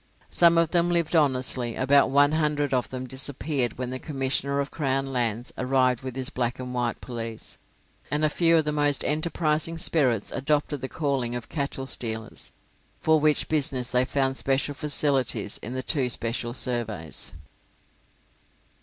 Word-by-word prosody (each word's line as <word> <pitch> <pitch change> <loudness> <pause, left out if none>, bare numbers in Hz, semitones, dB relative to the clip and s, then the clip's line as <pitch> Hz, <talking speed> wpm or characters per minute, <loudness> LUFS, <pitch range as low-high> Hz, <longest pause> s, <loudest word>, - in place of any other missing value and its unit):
Some 170 -1 +5
of 165 -1 +3
them 175 -1 +3
lived 170 -1 +1
honestly, 130 -5 +1
about 140 +2 +4
one 145 +2 +4
hundred 150 -3 0
of 125 -2 0
them 130 0 -5
disappeared 130 -1 -1
when 125 0 -4
the 130 - -4
Commissioner 140 -1 0
of 140 - -2
Crown 135 -3 -1
Lands 120 -1 -1
arrived 130 -1 +2
with 130 -1 -6
his 130 +2 -3
black 120 -2 -1
and 125 0 -6
white 120 -1 -1
police, 115 -3 -6 0.5
and 150 +2 +1
a - - +5
few 165 +2 +4
of 160 - +2
the 150 - +1
most 145 -1 +1
enterprising 155 +1 0
spirits 130 -10 +1
adopted 145 0 -1
the 130 - -4
calling 135 -6 -1
of 120 - -6
cattle 140 -3 -3
stealers, 110 -4 -3 0.5
for 160 0 +3
which 150 0 +2
business 135 -5 0
they 125 0 +4
found 135 0 0
special 135 +1 0
facilities 135 -7 -1
in 120 - -6
the 130 0 -3
two 135 -4 +1
special 120 +1 -2
surveys. 110 - -1
135 Hz, 160 wpm, -26 LUFS, 125-150 Hz, 0.5 s, Some